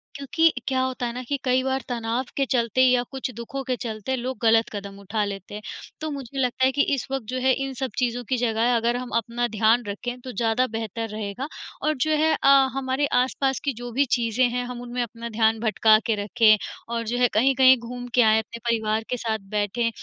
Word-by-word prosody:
क्योंकि 315 +4 +2 0.2
क्या 260 -1 +1
होता 260 -1 -2
है 235 - -3
ना 250 - -5
कि 280 +3 -2
कई 255 0 +2
बार 265 0 -1
तनाव 235 +1 -2
के 275 - +2
चलते 235 0 +2
या 250 -1 +5
कुछ 265 -1 -4
दुखों 235 +4 -5
के 255 -1 -1
चलते 225 +1 -3
लोग 255 +1 -4
ग़लत 225 0 +4
कदम 200 -1 -7
उठा 205 +2 -2
लेते 195 0 -7
हैं, 210 - -6 0.4
तो 315 - -2
मुझे 275 -1 -6
लगता 255 0 +1
है 260 - +3
कि 285 - +1
इस 265 - -4
वक़्त 270 -4 -2
जो 255 - -2
है 260 +1 +3
इन 270 - -5
सब 260 0 -4
चीज़ों 245 -1 0
की 260 - +1
जगह 235 0 +1
अगर 235 +1 +1
हम 250 0 -5
अपना 235 +1 -1
ध्यान 225 +2 +2
रखें, 245 +5 -5
तो 255 - -7
ज़्यादा 230 +3 +1
बेहतर 225 0 -4
रहेगा। 215 +5 -5 0.3
और 310 - +1
जो 310 - 0
है 315 +1 +3
अ, 275 - +6 0.2
हमारे 270 +1 0 0.2
आस-पास 265 +1 0
की 280 - +1
जो 245 +1 -7
भी 275 +4 +2
चीज़ें 230 +1 0
हैं 245 +1 -2
हम 245 -1 -6
उनमें 245 0 -4
अपना 235 0 -7
ध्यान 220 0 +2
भटका 220 -1 +4
के 225 - +1
रखें, 215 0 +5 0.3
और 235 0 -2
जो 240 +2 -1
है 245 0 +4
कहीं-कहीं 260 +3 +5
घूम 245 +1 -7
के 250 - +6
आएँ, 220 -1 +5
अपने 225 +1 -7
परिवार 220 -1 0
के 250 - -1
साथ 220 -2 -2 0.2
बैठें 210 +3 0
245 Hz, 225 wpm, -24 LUFS, 225-260 Hz, 0.4 s, अ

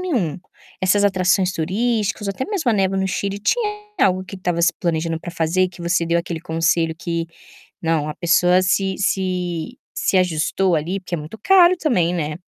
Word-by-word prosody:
nenhum. 235 - -1 0.4
Essas 195 +2 +3
atrações 185 -1 +2
turísticas 210 +5 -1
ou 200 - -1
até 260 - -3
mesmo 365 - 0
a - - +2
neve 195 -1 +1
no 190 0 0
Chile. 200 +1 -2
Tinha 425 - +1 0.3
algo 185 0 +3
que 195 - -9
estava 175 -2 -1
se 170 - +4
planejando 165 -1 -1
para 175 - -7
fazer 170 +1 0
e - - -1
que 175 -1 -12
você 170 -1 +1
deu 170 +1 +2
aquele 170 -1 -4
conselho 165 0 0
que, 170 0 -3 0.5
não, 160 -2 0
a 150 - -4
pessoa 175 +1 +3
se 190 +1 +1
se 185 +1 -2 0.2
se - - 0
ajustou 180 +1 +1
ali, 165 +5 -1
porque 180 -1 -6
é - - -2
muito 155 +9 -9
caro, 365 -2 +6
também, 180 - +1
né? 155 -3 -2
180 Hz, 190 wpm, -20 LUFS, 170-195 Hz, 0.5 s, caro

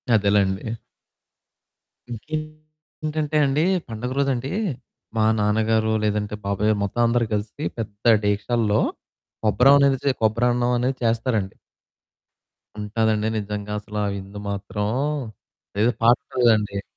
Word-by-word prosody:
అదేలెండి. 100 0 +1 1.4
ఇంకేంటంటే 155 +2 -5
అండి. 140 +3 +1 0.2
పండగ 115 +2 -5
రోజండి 135 -1 0 0.7
మా 110 - +3
నాన్నగారో 110 +1 +2
లేదంటే 105 0 -1
బాబాయొ 100 +2 +1
మొత్తం 110 +4 -1
అందరూ 115 0 +2
కలిసి 105 +8 -3
పెద్ద 110 +1 +1
డేగిక్షాల్లో 105 +1 +1 0.6
కొబ్బరం 125 +6 +6
అనేదిసీ 140 0 +3
కొబ్బరి 110 +2 +2
అన్నం 120 0 +1
అనేది 130 +2 -1
చేస్తారండి. 115 -3 0 1.2
ఉంటాదండి 110 +1 0
నిజంగా 105 0 -4
అసల 105 0 -8
ఆ - - 0
విందు 100 +1 -8
మాత్రం 100 +1 -3 1.0
ఏదో 120 +3 +4
పాట్నర్‌దండి. 115 -4 +2
110 Hz, 100 wpm, -23 LUFS, 105-125 Hz, 1.4 s, కొబ్బరం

